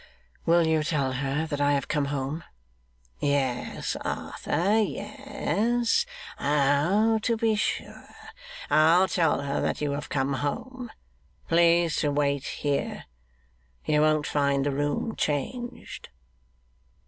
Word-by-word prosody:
'Will 170 0 +5
you 160 -1 +2
tell 150 -4 0
her 140 +4 -1
that 145 -2 -3
I 145 0 +3
have 140 - -1
come 150 -2 0
home?' 140 +3 -3 0.8
'Yes, 135 -4 -1
Arthur, 200 +6 -1
yes. 240 - 0 0.3
Oh, 150 +11 +2
to 230 +1 0
be 225 0 +2
sure! 210 - -3 0.6
I'll 165 +5 +5
tell 165 -6 +1
her 140 0 -2
that - - -1
you 150 -1 -1
have 145 +1 -4
come 135 0 0
home. 250 - -4 0.6
Please 170 0 +3
to 150 - +1
wait 140 -1 0
here. 145 -1 -2 0.8
You 150 -1 +2
won't 155 -1 +3
find 140 -1 +1
the 145 - +1
room 145 +10 -1
changed. 240 - -4
150 Hz, 120 wpm, -26 LUFS, 140-200 Hz, 0.8 s, Will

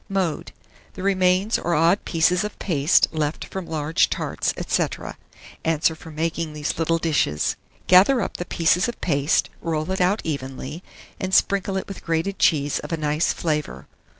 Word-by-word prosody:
Mode. 185 -6 -2 0.4
The 185 - -8
remains 190 +2 +2
or 170 0 0
odd 165 +6 +3
pieces 180 +3 +2
of 210 - -5
paste 150 -4 +3
left 155 -1 -2
from 190 -2 -6
large 155 0 +1
tarts, - - -1 0.2
&c. - - +2 0.8
answer 160 0 +2
for 160 - -12
making 160 0 -3
these 150 +1 -3
little 165 0 +2
dishes. 150 - 0 0.3
Gather 195 +9 +6
up - - -3
the 175 - -4
pieces 170 +1 +2
of 240 - -5
paste, 145 -2 +1
roll 160 +1 -2
it 190 - -1
out 190 +4 +2
evenly, 140 +1 -5 0.4
and 190 0 0
sprinkle 195 -1 +2
it 190 - -4
with 195 - -9
grated 165 +4 -1
cheese 145 -3 +2
of - - -8
a 165 - 0
nice 150 +1 +1
flavour. 150 -3 -3
165 Hz, 165 wpm, -23 LUFS, 155-185 Hz, 0.8 s, Gather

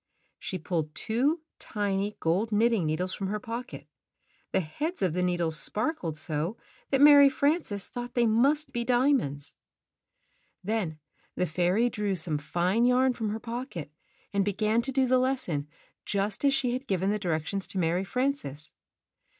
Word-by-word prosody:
She 185 - -4
pulled 160 -3 -3
two 275 +9 0 0.2
tiny 205 0 -2
gold 190 +8 0
knitting 215 -4 +2
needles 180 +4 -1
from 195 - -3
her 210 +2 -2
pocket. 235 +2 -6 0.7
The - - +2
heads 295 - -4
of 180 -4 +1
the 180 - 0
needles 175 -3 0
sparkled 210 - -1
so 155 +6 -1 0.3
that 270 - +2
Mary 285 -1 +9
Frances 280 - 0
thought 245 0 -7
they 240 -1 +3
must 270 +8 +3
be 240 - -2
diamonds. 245 - +1 1.1
Then 195 -6 -2 0.4
the 180 - +1
fairy 180 +7 +2
drew 210 -4 -1
some 160 -3 0
fine 180 +9 0
yarn 250 +1 +4
from 225 -3 -3
her 215 +2 -3
pocket 230 - -6 0.4
and 200 0 +2
began 215 +3 +1
to 265 +3 -3
do 265 0 +2
the 255 0 +3
lesson 250 - -1 0.4
just 200 +2 -1
as 275 -1 +4
she 255 -3 +1
had 260 +2 -4
given 190 +1 +1
the 210 - -1
directions 180 +2 -2
to - - -5
Mary 175 +1 +1
Frances. 195 - -2
210 Hz, 160 wpm, -28 LUFS, 175-250 Hz, 1.1 s, Mary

